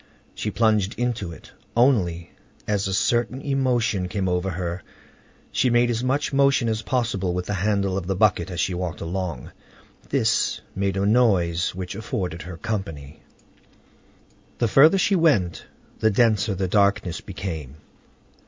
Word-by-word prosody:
She 105 - -3
plunged 110 -2 +1
into 120 -7 -2
it. 80 - -13 0.3
Only, 95 -10 +2 0.4
as 100 -2 0
a - - -2
certain 120 +4 +1
emotion 125 -8 0 0.2
overcame 90 +1 0
her, 85 +1 -4 0.7
she 130 - +2
made 120 0 +3
as 115 +1 -2
much 135 +3 0
motion 140 -3 +3
as 110 0 -1
possible 105 -8 -1
with 90 0 -2
the 105 - -3
handle 100 0 0
of 90 - -9
the 95 - 0
bucket 95 -4 +2
as 90 -3 -5
she 90 - 0
walked 90 0 -4
along. 85 -5 -4 0.6
This - - +1 0.2
made 95 0 -1
a 100 - +1
noise 95 -7 +2
which 90 0 -5
afforded 95 -6 -4
her 85 -1 -8
company. 80 -10 -5 1.4
The 120 - +1
further 150 - +6
she 195 +1 +2
went, 105 - +2 0.3
the 110 - +3
denser 105 -2 +2
the 95 0 -1
darkness 100 -2 +1
became. 80 -8 -6
100 Hz, 145 wpm, -23 LUFS, 90-120 Hz, 1.4 s, further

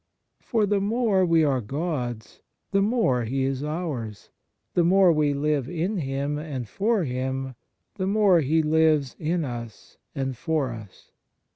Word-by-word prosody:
For 225 -4 0
the 200 0 +1
more 210 -2 +2
we 165 -1 +4
are 135 -4 +1
God 125 -3 -3
s, 105 - -23 0.3
the 195 0 +3
more 200 - +2
He 135 +4 -1
is 135 +1 -1
ours; 150 - -5 0.4
the 175 - +3
more 185 0 +5
we 150 -2 +2
live 145 -2 0
in 175 +5 -2
Him 140 -1 -2
and 140 -6 -5
for 205 - 0
Him, 130 0 -3 0.4
the 190 -1 -1
more 200 -3 +4
He 155 +3 +2
lives 155 -3 +2
in 165 +1 -1
us 120 -4 -8 0.2
and 135 -1 -2
for 155 -2 -1
us. 110 -4 -11
150 Hz, 155 wpm, -25 LUFS, 130-180 Hz, 0.4 s, more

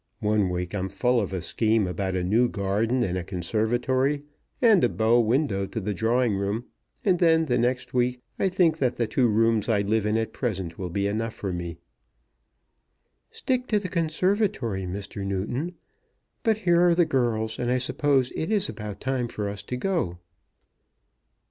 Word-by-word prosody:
One 105 -2 +2
week 90 0 -3
I'm 95 -1 -2
full 120 +5 +1
of 100 - -3
a 95 -2 -3
scheme 110 +3 +1
about 95 +1 -2
a 90 - 0
new 115 +7 +3
garden 110 +5 0
and 90 -4 -1
a - - -5
conservatory, 120 - 0 0.4
and 225 -7 +5
a 120 - +4
bow 115 +2 +3
window 115 -4 +1
to 105 - -4
the 105 0 -2
drawing 115 +3 +1
room; 100 +5 -2 0.4
and 185 -4 +3
then, 160 -2 +4
the 125 -4 +1
next 125 +2 -1
week, 125 0 +1 0.2
I 195 - +2
think 175 -4 +2
that 125 -3 +1
the 120 - 0
two 125 +2 +2
rooms 115 0 +2
I 105 -3 +3
live 105 +1 0
in 105 +1 +1
at 115 0 -2
present 95 -9 -3
will 90 -2 -3
be 100 +3 -1
enough 110 +2 -2
for 95 -3 -4
me." 85 -1 -5 1.5
"Stick 255 -1 -2
to 215 - +2
the 195 -3 -3
conservatory, 165 - 0
Mr. 100 +2 -5
Newton. 115 - -3 0.7
But 220 -2 +2
here 175 -5 +3
are 175 -1 +5
the 175 0 +4
girls, 115 -5 0
and 120 -1 -1
I 125 - +2
suppose 130 0 +1
it 160 - -2
is 210 -2 +2
about 105 -2 -7
time 130 -2 -1
for 105 -3 -4
us 100 0 -5
to 125 - -5
go." 125 - -1
115 Hz, 180 wpm, -26 LUFS, 100-135 Hz, 1.5 s, and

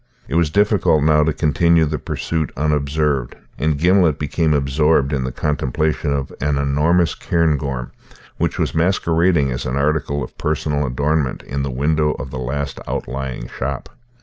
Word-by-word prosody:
It - - -6
was 85 -1 +3
difficult 100 -5 +3
now 75 0 +4
to 80 - +1
continue 80 +3 +3
the 75 -1 -2
pursuit 80 +4 -3
unobserved: 75 -2 0 0.2
and 75 0 +1
Gimblet 85 -1 +3
became 80 +2 0
absorbed 75 0 +2
in 65 -2 0
the 65 - -3
contemplation 75 +2 -1
of 70 -2 -2
an 75 0 +1
enormous 75 +5 +2
cairngorm, 70 -7 -1 0.5
which - - -1
was - - -1
masquerading 85 -3 +2
as - - -3
an 65 - -2
article 70 0 0
of - - -9
personal 75 -2 -1
adornment 70 +1 -1
in 70 +1 -4
the 70 - -2
window 75 +4 +1
of 65 0 -7
the 65 - -5
last 70 +3 -3
outlying 65 0 -4
shop. 65 +2 -5
75 Hz, 155 wpm, -20 LUFS, 70-80 Hz, 0.5 s, now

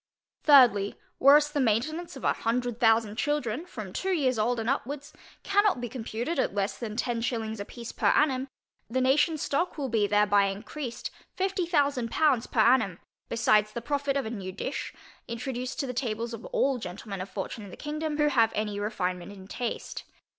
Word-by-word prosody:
Thirdly, 245 -9 +6 0.2
Whereas 295 +2 +6
the 295 - -1
maintainance 270 +9 0
of - - -10
a - - +3
hundred 240 0 -1
thousand 225 -2 +3
children, 295 +2 -1
from 215 - -7
two 385 - -2
years 265 -10 +1
old, 235 +2 +1
and 225 - -3
upwards, 285 +3 -2 0.3
cannot 405 -6 +3
be 240 - -3
computed 240 +6 -3
at - - 0
less 200 0 0
than 220 -3 -5
ten 240 0 -1
shillings 225 -3 -2
a 200 - -4
piece 235 +1 -8
per - - 0
annum, 265 -3 +3 0.4
the 255 +3 0
nationŌĆÖs 290 +5 +3
stock 310 +4 -1
will 275 -3 -2
be 220 -3 +2
thereby 205 -1 +4
encreased 230 +6 -6 0.2
fifty 380 -2 -1
thousand 285 -7 +1
pounds 265 -4 +2
per 225 - +2
annum, 225 -6 +4 0.3
besides 215 -2 +3
the 235 - -4
profit 280 +1 0
of 275 - -1
a 220 - -4
new 195 -5 -5
dish, - - -4 0.4
introduced 250 +2 -4
to - - 0
the 250 - -4
tables 235 -1 -2
of 230 - -7
all 270 -2 +1
gentlemen 195 0 -6
of 185 - -6
fortune 205 +2 -5
in 200 - -9
the - - -11
kingdom, 305 0 -3
who 295 -1 +3
have 230 -5 +3
any 210 -1 -2
refinement 185 -3 -2
in 190 -2 -11
taste. 240 +3 -4
240 Hz, 190 wpm, -28 LUFS, 215-285 Hz, 0.4 s, Thirdly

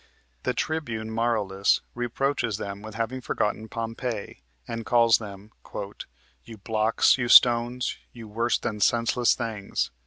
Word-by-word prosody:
The - - -1
Tribune 120 -9 -3
Marullus 110 -4 +1
reproaches 120 -2 -1
them 100 -1 -6
with 110 0 -9
having 115 +3 -3
forgotten 110 -1 -2
Pompey, 115 -1 -5 0.3
and 115 0 -4
calls 115 -1 +4
them 105 -1 -10 0.9
"You 115 -2 -11
blocks, 110 +4 +2
you 120 - 0
stones, 120 +1 +5
you 115 -2 -11
worse 115 +2 0
than 105 -1 -4
senseless 120 +2 +2
things." 110 -5 -3
115 Hz, 125 wpm, -26 LUFS, 110-120 Hz, 0.9 s, stones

